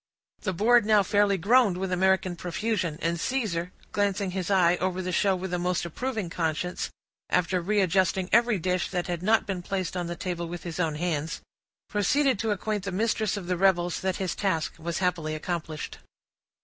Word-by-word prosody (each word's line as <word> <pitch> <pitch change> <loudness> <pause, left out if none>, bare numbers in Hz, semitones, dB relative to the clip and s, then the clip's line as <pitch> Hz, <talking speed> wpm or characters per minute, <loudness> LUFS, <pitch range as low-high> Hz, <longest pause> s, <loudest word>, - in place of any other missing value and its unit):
The 190 - -1
board 230 +6 +4
now 210 -1 +4
fairly 205 0 +3
groaned 210 0 +4
with 190 0 -3
American 185 0 +2
profusion, 180 -1 -2
and 170 0 0
Caesar, 180 -8 -1 0.2
glancing 200 -1 0
his 185 0 -3
eye 180 -3 +4
over 185 0 -1
the 185 0 -2
show 195 +1 +2
with 185 0 -5
a 180 - 0
most 180 0 0
approving 220 +3 -3
conscience, 170 +1 -2 0.4
after 180 0 +1
readjusting 190 -1 +2
every 235 0 +4
dish 180 +1 -1
that 180 -2 -2
had 175 -2 -3
not 220 +4 +3
been 190 -3 -3
placed 185 -1 -3
on 175 -1 -2
the 175 - -4
table 175 -4 -3
with 175 +1 -7
his 170 -1 -5
own 160 -4 0
hands, 160 -1 -2 0.5
proceeded 255 +4 +2
to 225 - -1
acquaint 210 0 -1
the 195 - -2
mistress 215 +2 0
of 195 - -5
the 180 0 -1
revels 175 -2 +2
that 190 0 -1
his 190 -2 -2
task 165 -6 -1
was 170 +1 -3
happily 170 -4 0
accomplished. 160 -1 -4
185 Hz, 185 wpm, -27 LUFS, 175-205 Hz, 0.5 s, board